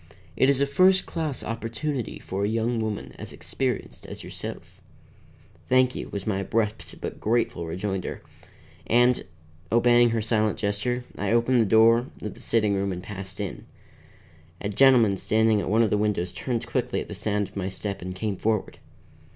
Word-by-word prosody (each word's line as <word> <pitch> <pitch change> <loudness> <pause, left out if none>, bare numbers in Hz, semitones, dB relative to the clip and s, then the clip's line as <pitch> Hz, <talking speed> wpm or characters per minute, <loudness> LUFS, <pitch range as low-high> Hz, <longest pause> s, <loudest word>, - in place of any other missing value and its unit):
It 130 - +4
is 140 -1 +3
a 140 - +3
first 185 +7 +4
class 155 -6 -3
opportunity 115 +3 -3
for 95 +1 -4
a - - +2
young 115 +2 0
woman 110 -2 -3
as - - -7
experienced 130 -5 -4
as - - -8
yourself." - - -8 0.9
"Thank 130 0 +4
you," - - -6
was 100 -1 -5
my 100 -3 0
abrupt 105 +2 -2
but - - -6
grateful 110 -6 0
rejoinder; 95 +2 -3 0.6
and, 120 +1 +4 0.5
obeying 120 +1 +5
her 115 0 0
silent 110 -1 +1
gesture, 105 +4 -1 0.2
I 100 +1 0
opened 120 +1 +3
the - - +3
door 115 +4 +5 0.2
of 105 - -4
the - - -15
sitting 105 -3 +1
room 100 0 0
and 90 -1 -5
passed 95 -1 -7
in. 100 -3 -5 0.9
A 100 - -3
gentleman 115 -3 +5
standing 110 +1 +2
at - - -3
one 110 +3 +4
of 110 - +1
the 105 - +2
windows 100 -4 0
turned 115 +5 -2
quickly 125 0 -1
at - - -5
the - - -7
sound 105 0 -1
of - - -23
my 95 -1 -2
step 100 +1 -5
and 90 +1 -5
came 100 0 -2
forward. 110 0 -1
110 Hz, 175 wpm, -26 LUFS, 100-120 Hz, 0.9 s, obeying